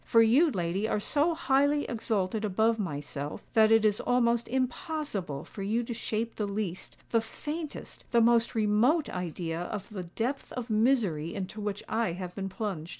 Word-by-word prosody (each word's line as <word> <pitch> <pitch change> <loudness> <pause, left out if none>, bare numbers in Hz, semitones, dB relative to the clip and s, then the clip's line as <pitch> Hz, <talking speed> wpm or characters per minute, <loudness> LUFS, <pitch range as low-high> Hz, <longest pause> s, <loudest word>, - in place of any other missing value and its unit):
For 230 0 +5
you, 265 +9 +5
lady, 190 - -1
are 210 - 0
so 300 +9 +1
highly 285 -1 +2
exalted 220 -3 -1
above 220 +3 +2
myself, 145 -5 -4
that 220 -1 +5
it 225 -1 +5
is 210 -1 +3
almost 235 -1 +2
impossible 255 - -2
for 200 - -9
you 220 +5 0
to 235 - -4
shape 225 0 -3
the 210 - -1
least—the 200 +3 -2
faintest—the 295 -2 -3
most 235 0 +3
remote 225 +9 +3
idea 170 -2 -3
of 200 +3 -5
the 190 -5 -6
depth 230 +10 -3
of 245 -2 -5
misery 215 - +2
into 200 +2 -5
which 205 -1 -3
I 225 -6 0
have 180 0 -6
been 195 0 -4
plunged. 190 -5 -4
220 Hz, 160 wpm, -29 LUFS, 190-240 Hz, -, For